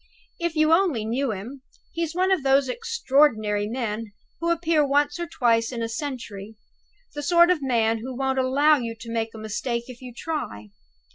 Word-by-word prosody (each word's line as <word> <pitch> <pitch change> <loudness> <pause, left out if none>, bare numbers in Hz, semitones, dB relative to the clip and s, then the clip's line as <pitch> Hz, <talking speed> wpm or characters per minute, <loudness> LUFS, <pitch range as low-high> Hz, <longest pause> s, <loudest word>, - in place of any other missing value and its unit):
If 340 -1 -2
you 310 +1 +4
only 330 - +2
knew 250 +3 -1
him! 225 +7 -7 0.3
He's 335 -1 -3
one 370 +1 +2
of 375 - +3
those 270 0 +3
extraordinary 255 - +1
men 225 -2 -4 0.3
who 335 - -1
appear 330 -2 +2
once 290 +3 +1
or 345 - -3
twice 230 -4 +1
in 235 -2 -3
a - - -1
century 225 -4 -6 0.6
the 295 - -5
sort 345 +3 +5
of 345 -5 +1
man 230 -4 +1
who 250 +2 -6
won't 265 0 0
allow 285 +4 +4
you 230 -3 -4
to 230 0 -8
make 225 -1 -2
a - - -8
mistake 235 +3 -3
if 250 0 -11
you 250 -1 -8
try. 235 - -5
260 Hz, 185 wpm, -24 LUFS, 230-310 Hz, 0.6 s, sort